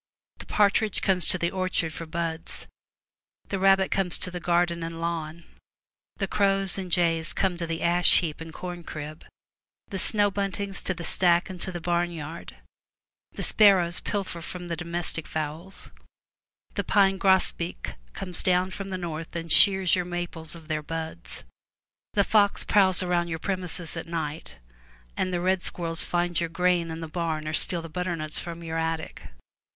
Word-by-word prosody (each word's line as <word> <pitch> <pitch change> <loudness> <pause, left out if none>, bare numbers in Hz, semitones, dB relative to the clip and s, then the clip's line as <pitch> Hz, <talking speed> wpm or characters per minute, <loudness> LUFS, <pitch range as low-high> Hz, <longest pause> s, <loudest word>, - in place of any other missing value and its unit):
The - - -10
partridge 210 0 +2
comes 180 -4 +3
to - - +3
the 170 -1 0
orchard 185 -4 -1
for 165 - -7
buds; 165 0 -4 0.8
the 195 - -1
rabbit 195 0 +4
comes 190 -3 +1
to 185 - -2
the 180 - -4
garden 170 0 +1
and 165 0 -5
lawn; 165 -1 -3 0.7
the 195 - 0
crows 195 -2 +2
and 185 -2 -5
jays 165 -2 +2
come 190 -2 +1
to 170 -1 -3
the 165 0 -3
ash 175 +1 +5
heap 160 -2 -4
and 165 0 -7
corn 175 +1 -6
crib, 155 0 -7 0.7
the 195 - -4
snow 205 0 +2
buntings 200 0 -2
to 190 - -1
the 170 - -6
stack 175 +2 +2
and 180 -2 -8
to 185 - 0
the 175 - -5
barn 175 +1 +1
yard; 160 0 -7 0.8
the - - -5
sparrows 185 -5 +5
pilfer 190 -4 -3
from 175 +1 -7
the 170 - -1
domestic 170 -1 -3
fowls; 155 +5 -5 0.8
the - - -1
pine 195 -2 +3
grosbeak 190 -3 +1 0.2
comes 180 -3 -2
down 185 0 +2
from 195 0 -6
the 185 - -3
north 165 -2 -5
and 165 -1 -4
shears 190 -1 +6
your 180 - 0
maples 175 -2 -3
of 165 -2 -12
their 155 -1 -1
buds; 160 - -6 0.7
the 200 - +5
fox 205 -1 +3
prowls 190 -3 +4
about 175 -1 +1
your 165 -1 -3
premises 180 -2 -3
at 165 0 -5
night, 160 - -4 0.6
and 185 - -1
the 175 - 0
red 185 +1 +1
squirrels 165 -2 +1
find 175 -1 0
your 170 -1 -1
grain 180 0 +1
in 160 0 -5
the 165 - -4
barn 160 -2 -2
or 155 - -2
steal 170 +1 +1
the - - -6
butternuts 165 -2 -3
from 170 -1 -7
your 165 0 -2
attic. 160 0 -3
175 Hz, 175 wpm, -27 LUFS, 165-185 Hz, 0.8 s, shears